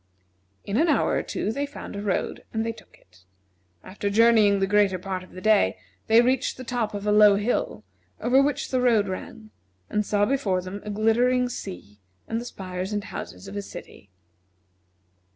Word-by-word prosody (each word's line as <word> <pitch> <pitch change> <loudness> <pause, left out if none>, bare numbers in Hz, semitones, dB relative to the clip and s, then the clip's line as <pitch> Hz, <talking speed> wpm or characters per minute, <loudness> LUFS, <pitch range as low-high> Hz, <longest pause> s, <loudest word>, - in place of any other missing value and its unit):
In 200 - -1
an 325 +5 +3
hour 300 - +2
or - - +1
two - - -3
they 280 +5 -2
found 285 - -9
a 200 - -4
road 205 -2 -2
and 220 0 -1
they 230 - -1
took 220 -2 -16
it. 90 0 -25 0.6
After 200 +2 -4
journeying 215 -1 +5
the 195 - +2
greater 200 -1 +3
part 185 0 -4
of 185 - -17
the 185 - -9
day, 210 - +3 0.3
they 225 +1 +6
reached 255 +1 0
the 255 - -7
top 235 -4 -2
of 205 0 -5
a 210 - +2
low 210 -1 +7
hill, 210 +5 -1 0.4
over 260 +3 +4
which 285 0 -1
the 255 -1 +1
road 225 -5 +3
ran, 215 +3 -7 0.4
and 210 - +1
saw 205 0 +1
before 210 -8 0
them 190 +2 -7
a 210 - -7
glittering 240 +4 +2
sea 105 - -8 0.3
and 225 +1 -2
the - - -8
spires 185 -3 -5
and 205 -1 -2
houses 195 - -8
of 195 - -8
a 205 - -2
city. 100 - -11
210 Hz, 190 wpm, -25 LUFS, 195-235 Hz, 0.6 s, low